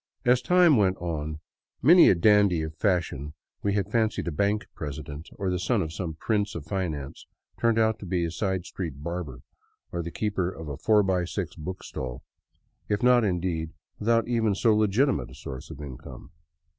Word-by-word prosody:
As 125 Hz, +1 st, +4 dB
time 175 Hz, 0 st, +5 dB
went 95 Hz, -3 st, +2 dB
on 80 Hz, -3 st, -4 dB, 0.4 s
many 170 Hz, +6 st, +7 dB
a -, -, +5 dB
dandy 100 Hz, -2 st, +4 dB
of 80 Hz, 0 st, -5 dB
fashion 80 Hz, -6 st, -1 dB, 0.3 s
we 100 Hz, -, 0 dB
had 100 Hz, -1 st, -1 dB
fancied 110 Hz, -5 st, 0 dB
a -, -, 0 dB
bank 100 Hz, +7 st, 0 dB
president, 75 Hz, +1 st, -7 dB
or 95 Hz, -2 st, -1 dB
the 90 Hz, -, -1 dB
son 100 Hz, +2 st, +1 dB
of 80 Hz, 0 st, -6 dB
some 85 Hz, -3 st, -4 dB
prince 105 Hz, +4 st, -1 dB
of 80 Hz, -4 st, -6 dB
finance, 80 Hz, -7 st, -4 dB, 0.3 s
turned 115 Hz, -1 st, +2 dB
out 110 Hz, -1 st, +2 dB
to 100 Hz, -, -8 dB
be 85 Hz, -1 st, 0 dB
a 85 Hz, -, -3 dB
side 95 Hz, -1 st, -2 dB
street 80 Hz, -8 st, -6 dB
barber, 85 Hz, -7 st, -5 dB, 0.5 s
or 85 Hz, -, -2 dB
the 85 Hz, -, -5 dB
keeper 95 Hz, 0 st, -1 dB
of 80 Hz, -4 st, -8 dB
a 70 Hz, -, -5 dB
four 105 Hz, +5 st, +4 dB
by 95 Hz, -2 st, +1 dB
six 90 Hz, -1 st, -4 dB
book 90 Hz, +4 st, -6 dB
stall, 60 Hz, -2 st, -6 dB, 0.7 s
if 105 Hz, +1 st, 0 dB
not 125 Hz, -1 st, +5 dB
indeed 90 Hz, -4 st, -1 dB, 0.3 s
without 115 Hz, +2 st, +2 dB
even 115 Hz, -4 st, +1 dB
so 110 Hz, +1 st, +3 dB
legitimate 110 Hz, +6 st, +2 dB
a -, -, -13 dB
source 65 Hz, -2 st, -8 dB
of -, -, -9 dB
income. 70 Hz, -4 st, -9 dB
95 Hz, 185 wpm, -27 LUFS, 80-105 Hz, 0.7 s, many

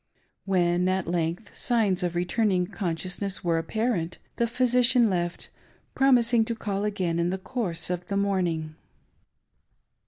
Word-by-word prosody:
When, 180 Hz, -1 st, +2 dB
at 190 Hz, -1 st, 0 dB
length, 170 Hz, +4 st, -2 dB
signs 220 Hz, -7 st, +1 dB
of 175 Hz, -1 st, -2 dB
returning 180 Hz, +1 st, +1 dB
consciousness 185 Hz, +1 st, -3 dB
were 165 Hz, -2 st, +1 dB
apparent, 180 Hz, -1 st, -1 dB, 0.2 s
the 235 Hz, -, +2 dB
physician 245 Hz, -1 st, +3 dB
left, 175 Hz, -1 st, -3 dB, 0.4 s
promising 245 Hz, -3 st, +4 dB
to 230 Hz, -, -3 dB
call 205 Hz, -2 st, -2 dB
again 185 Hz, -5 st, -1 dB
in 170 Hz, +1 st, +1 dB
the 190 Hz, -, -1 dB
course 190 Hz, -5 st, -3 dB
of 180 Hz, 0 st, -4 dB
the 200 Hz, -, -1 dB
morning. 175 Hz, -6 st, 0 dB
190 Hz, 130 wpm, -26 LUFS, 175-225 Hz, 0.4 s, promising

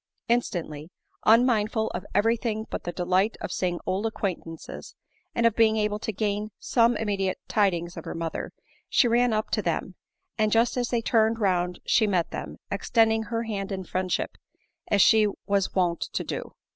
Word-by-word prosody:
Instantly, 170 Hz, -10 st, -1 dB, 0.4 s
unmindful 220 Hz, -1 st, +4 dB
of 180 Hz, +3 st, -6 dB
every 225 Hz, +3 st, +4 dB
thing 220 Hz, -2 st, -3 dB
but -, -, -4 dB
the 175 Hz, -, -2 dB
delight 185 Hz, +4 st, +1 dB
of -, -, -5 dB
seeing 175 Hz, -2 st, -1 dB
old 195 Hz, +4 st, 0 dB
acquaintances, 180 Hz, -6 st, -5 dB, 0.4 s
and 235 Hz, -, +2 dB
of 230 Hz, -2 st, +4 dB
being 220 Hz, -1 st, +4 dB
able 210 Hz, -1 st, 0 dB
to 220 Hz, -, -3 dB
gain 210 Hz, 0 st, -2 dB
some 235 Hz, 0 st, +2 dB
immediate 195 Hz, -3 st, -1 dB
tidings 175 Hz, -5 st, +1 dB
of 165 Hz, -, -8 dB
her -, -, -5 dB
mother, 165 Hz, -1 st, -4 dB, 0.4 s
she 245 Hz, -, +4 dB
ran 240 Hz, +1 st, +3 dB
up 215 Hz, 0 st, -1 dB
to -, -, +1 dB
them; -, -, -2 dB, 0.5 s
and 215 Hz, 0 st, +2 dB
just 230 Hz, +2 st, +3 dB
as 245 Hz, -2 st, -1 dB
they 235 Hz, -2 st, 0 dB
turned 225 Hz, 0 st, +3 dB
round 180 Hz, -4 st, 0 dB
she 220 Hz, -, +3 dB
met 180 Hz, -4 st, 0 dB
them, -, -, -6 dB
extending 225 Hz, -1 st, +2 dB
her 230 Hz, +1 st, -2 dB
hand 200 Hz, -3 st, -4 dB
in 190 Hz, -1 st, -3 dB
friendship, 185 Hz, +1 st, -2 dB, 0.5 s
as 200 Hz, -2 st, +5 dB
she 220 Hz, -2 st, +5 dB, 0.2 s
was 200 Hz, -2 st, 0 dB
wont 175 Hz, -3 st, +1 dB
to -, -, -1 dB
do. -, -, -5 dB
210 Hz, 175 wpm, -26 LUFS, 185-225 Hz, 0.5 s, as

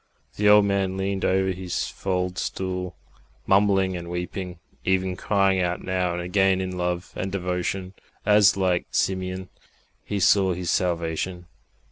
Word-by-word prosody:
The 105 Hz, 0 st, +3 dB
old 105 Hz, 0 st, +7 dB
man 95 Hz, -1 st, 0 dB
leaned 95 Hz, 0 st, -2 dB
over 95 Hz, 0 st, +2 dB
his 90 Hz, -1 st, -3 dB
fald 90 Hz, -1 st, -2 dB
stool, 90 Hz, -1 st, -3 dB, 0.5 s
mumbling 95 Hz, -1 st, +3 dB
and 85 Hz, -1 st, -6 dB
weeping, 90 Hz, +1 st, -5 dB, 0.3 s
even 95 Hz, 0 st, +1 dB
crying 95 Hz, -1 st, +2 dB
out 90 Hz, -1 st, -1 dB
now 90 Hz, -1 st, 0 dB
and 85 Hz, -, -3 dB
again 95 Hz, +1 st, +2 dB
in 95 Hz, -1 st, -3 dB
love 90 Hz, 0 st, -2 dB
and 95 Hz, -, -3 dB
devotion, 90 Hz, 0 st, -2 dB, 0.3 s
as, 105 Hz, -1 st, +5 dB
like 90 Hz, -2 st, +1 dB
Simeon, 95 Hz, 0 st, -1 dB, 0.5 s
he 105 Hz, -, -3 dB
saw 95 Hz, 0 st, +4 dB
his 90 Hz, -1 st, -2 dB
Salvation. 90 Hz, 0 st, -1 dB
95 Hz, 140 wpm, -24 LUFS, 90-95 Hz, 0.5 s, old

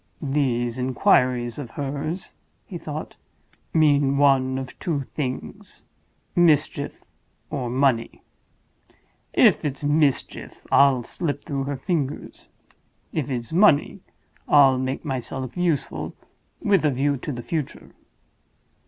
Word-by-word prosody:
"These 130 Hz, -4 st, -1 dB
inquiries 125 Hz, -1 st, +2 dB
of 135 Hz, -5 st, -6 dB
hers," 145 Hz, +5 st, -4 dB, 0.3 s
he 175 Hz, -4 st, -7 dB
thought, 155 Hz, -1 st, -7 dB, 0.5 s
"mean 145 Hz, -3 st, +3 dB
one 135 Hz, -2 st, +3 dB
of 130 Hz, -1 st, -7 dB
two 155 Hz, -5 st, -1 dB
things—Mischief, 150 Hz, +3 st, -2 dB, 0.5 s
or 130 Hz, -5 st, -3 dB
Money! 125 Hz, -2 st, 0 dB, 1.1 s
If -, -, +5 dB
it's 140 Hz, -1 st, -3 dB
Mischief, 145 Hz, -1 st, 0 dB
I'll 135 Hz, -3 st, +5 dB
slip 145 Hz, 0 st, -4 dB
through 140 Hz, -3 st, -2 dB
her 140 Hz, 0 st, -3 dB
fingers. 145 Hz, -1 st, -3 dB, 0.6 s
If 150 Hz, -3 st, -2 dB
it's 120 Hz, 0 st, -4 dB
Money, 185 Hz, -1 st, +4 dB, 0.5 s
I'll 135 Hz, -3 st, +6 dB
make 130 Hz, +4 st, -3 dB
myself 130 Hz, -2 st, -4 dB
useful, 175 Hz, -5 st, -1 dB, 0.4 s
with 200 Hz, -4 st, +2 dB
a 150 Hz, -, +4 dB
view 140 Hz, +2 st, +1 dB
to 140 Hz, -, -5 dB
the 120 Hz, -3 st, -6 dB
future." 155 Hz, -1 st, -4 dB
140 Hz, 110 wpm, -24 LUFS, 130-150 Hz, 1.1 s, I'll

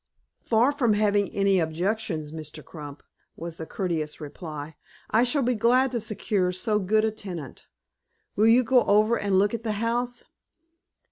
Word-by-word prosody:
"Far 235 Hz, +4 st, +3 dB
from 255 Hz, -7 st, +2 dB
having 205 Hz, -1 st, +2 dB
any 195 Hz, -1 st, +2 dB
objections, 165 Hz, -1 st, -2 dB
Mr. 155 Hz, -1 st, -8 dB
Crump," 145 Hz, -3 st, -10 dB, 0.3 s
was 165 Hz, 0 st, -7 dB
the 160 Hz, -, -7 dB
courteous 160 Hz, -5 st, -3 dB
reply, 150 Hz, 0 st, -8 dB, 0.4 s
"I 220 Hz, -, +4 dB
shall 265 Hz, +3 st, +2 dB
be 250 Hz, +1 st, +2 dB
glad 245 Hz, +3 st, +3 dB
to 240 Hz, -, -1 dB
secure 205 Hz, -3 st, -1 dB
so 210 Hz, +4 st, 0 dB
good 215 Hz, +3 st, +2 dB
a 220 Hz, -, 0 dB
tenant. 180 Hz, -10 st, -8 dB, 0.7 s
Will 215 Hz, +2 st, +4 dB
you 240 Hz, +3 st, +6 dB
go 250 Hz, +1 st, +4 dB
over 215 Hz, +3 st, +4 dB
and 200 Hz, -4 st, +1 dB
look 205 Hz, +3 st, +3 dB
at 230 Hz, -, -3 dB
the 220 Hz, -2 st, -2 dB
house?" 240 Hz, +3 st, -2 dB
205 Hz, 160 wpm, -26 LUFS, 165-230 Hz, 0.7 s, you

